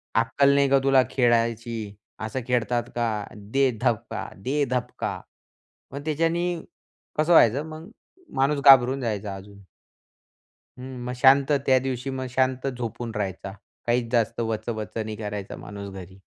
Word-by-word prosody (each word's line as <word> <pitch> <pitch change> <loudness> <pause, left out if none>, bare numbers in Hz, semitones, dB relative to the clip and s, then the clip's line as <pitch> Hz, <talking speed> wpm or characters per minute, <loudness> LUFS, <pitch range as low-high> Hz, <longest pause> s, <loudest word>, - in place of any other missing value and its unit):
अक्कल 140 +5 +3
नाही 140 -1 +3
का 135 0 +5
तुला 135 -1 +5
खेळायची, 115 -3 0 0.2
असं 110 +4 -3
खेळतात 120 -1 +1
का? 110 -3 -1
दे 120 +7 +1
धबका! 115 -3 -1 0.2
दे 145 +3 +1
धपका! 125 - -3 0.7
मग 140 +2 -7
त्याच्याने 165 +3 0 0.7
कसं 155 +3 +2
व्हायचं 130 0 +5
मग 160 +5 -9 0.5
माणूस 140 +2 +2
घाबरून 135 0 +7
जायचा 105 -4 -3
अजून. 100 +1 -12 1.2
हं, 130 0 -8
मग 125 - -3
शांत 135 +3 +5
त्या 130 -1 +5
दिवशी 130 0 -3
मग 130 -1 -4
शांत 130 +1 0
झोपून 120 -2 -4
राहायचा, 95 -1 -4 0.4
काहीच 120 0 +1
जास्त 115 -1 +1
वचवच 110 -2 -3
नाही 110 -1 -3
करायचा 105 -2 -5
माणूस 100 -1 -8
घरी. 95 0 -10
120 Hz, 135 wpm, -25 LUFS, 110-135 Hz, 1.2 s, घाबरून